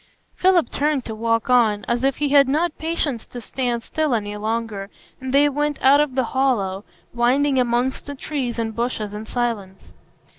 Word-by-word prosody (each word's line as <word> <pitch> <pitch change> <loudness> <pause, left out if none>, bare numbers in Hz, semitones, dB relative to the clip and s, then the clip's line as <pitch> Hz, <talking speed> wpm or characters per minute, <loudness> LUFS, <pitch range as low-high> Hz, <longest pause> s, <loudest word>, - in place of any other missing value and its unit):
Philip 365 -3 +3
turned 290 -3 0
to 220 - -5
walk 230 +1 0
on, 230 -5 +3
as 240 +1 0
if 270 -1 +2
he 295 -1 0
had 280 -1 +6
not 310 +4 0
patience 315 -7 -1
to 245 - -8
stand 240 -1 -3
still 305 -3 0
any 205 -2 -3
longer, 215 -2 -3 0.3
and 260 -1 -5
they 285 +2 +5
went 295 +1 -1
out 275 +2 +5
of 290 -4 -1
the 260 - +2
hollow, 230 -7 0 0.3
winding 260 +3 +2
amongst 245 +2 0
the 285 - -5
trees 260 -4 -3
and 225 -1 -3
bushes 230 -3 -2
in 215 +1 -7
silence. 215 -6 -4
250 Hz, 180 wpm, -22 LUFS, 225-280 Hz, 0.3 s, had